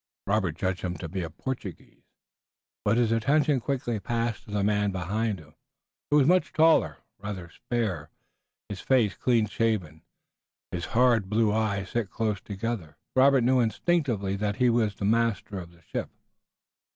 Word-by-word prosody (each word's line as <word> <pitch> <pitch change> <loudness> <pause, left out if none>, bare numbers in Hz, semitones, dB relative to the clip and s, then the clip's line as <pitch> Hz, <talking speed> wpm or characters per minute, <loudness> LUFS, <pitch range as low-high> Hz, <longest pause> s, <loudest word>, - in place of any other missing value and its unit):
Robert 100 -6 0
judged 95 +1 -2
him 90 -1 -3
to 85 - -6
be 95 +3 -4
a 85 - -4
Portuguese. 100 +1 -7 0.8
But 105 +3 +2
his 120 -2 +2
attention 140 +5 +2
quickly 120 -3 -2
passed 115 +2 -2
to - - -15
the 105 -1 -1
man 105 0 +1
behind 100 +4 -1
him, 75 -2 -16 0.6
who 145 - +4
was 140 - +5
much 180 +4 +3
taller, 160 +1 +4 0.2
rather 100 -4 -6
spare, 95 -11 -3 0.6
his 100 -2 -6
face 120 -7 +3
clean 120 -3 +2
shaven, 105 -8 -1 0.7
his 85 -2 -3
hard 120 -6 +4
blue 110 0 +2
eyes 100 -3 -1
set 120 -5 -1
close 105 -2 -2
together. 100 -6 -5 0.2
Robert 135 0 +5
knew 130 +1 +3
instinctively 115 - 0
that 105 0 -1
he 125 +1 +3
was 110 -4 0
master 105 -2 0
of 85 -1 -9
the 85 -1 -22
ship. - - -4
105 Hz, 155 wpm, -27 LUFS, 95-120 Hz, 0.8 s, was